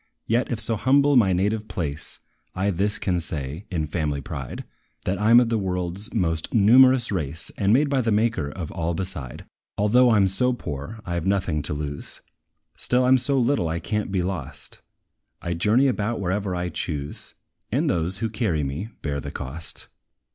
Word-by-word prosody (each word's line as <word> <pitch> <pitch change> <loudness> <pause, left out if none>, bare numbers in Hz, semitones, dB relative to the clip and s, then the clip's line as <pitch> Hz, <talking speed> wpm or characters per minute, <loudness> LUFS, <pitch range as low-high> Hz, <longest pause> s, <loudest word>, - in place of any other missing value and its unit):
Yet, 120 +4 0
if 115 - -1
so 110 0 +4
humble 140 +4 +4
my 105 -7 +5
native 105 +4 0
place, 75 -4 -5 0.3
I 95 +2 +1
this 100 +3 0
can 90 -2 0
say, 75 +1 -5
in 85 -5 -1
family 75 -2 -2
pride, 65 -1 -6 0.4
That 95 +1 -1
I 105 +1 +2
'm 120 +1 +9
of 120 -2 +2
the 115 -1 +1
world's 90 +2 -3
most 80 -6 -1
numerous 125 +3 +6
race, 80 -4 -3
And 100 0 +1
made 140 +6 +4
by 140 -2 +1
the 115 -2 0
Maker 105 -8 +1
of 80 +1 -6
all 85 0 -2
beside. 80 -9 -5 0.3
Although 120 +5 +4
I 115 - +4
'm 100 -1 +4
so 125 +7 +1
poor, 90 - -6
I 85 - -4
have 85 +1 -2
nought 100 -1 +2
to 75 -3 -2
lose; 75 -1 -6 0.5
Still 125 +1 +2
I - - +3
'm 130 0 +6
so 140 +3 +2
little 125 -8 +2
I 80 +1 -2
can't 105 +4 -2
be 95 -2 0
lost: 90 -7 -6 0.6
I 85 - -3
journey 105 +10 +3
about 115 -3 0
wherever 95 0 -1
I 90 0 -2
choose, 75 -4 -5 0.4
And - - +1
those, 90 +2 0
who 110 +2 -2
carry 105 -9 0
me, 75 +11 -4
bear 70 -2 -2
the - - -6
cost. 75 +5 -6
95 Hz, 190 wpm, -24 LUFS, 80-115 Hz, 0.6 s, m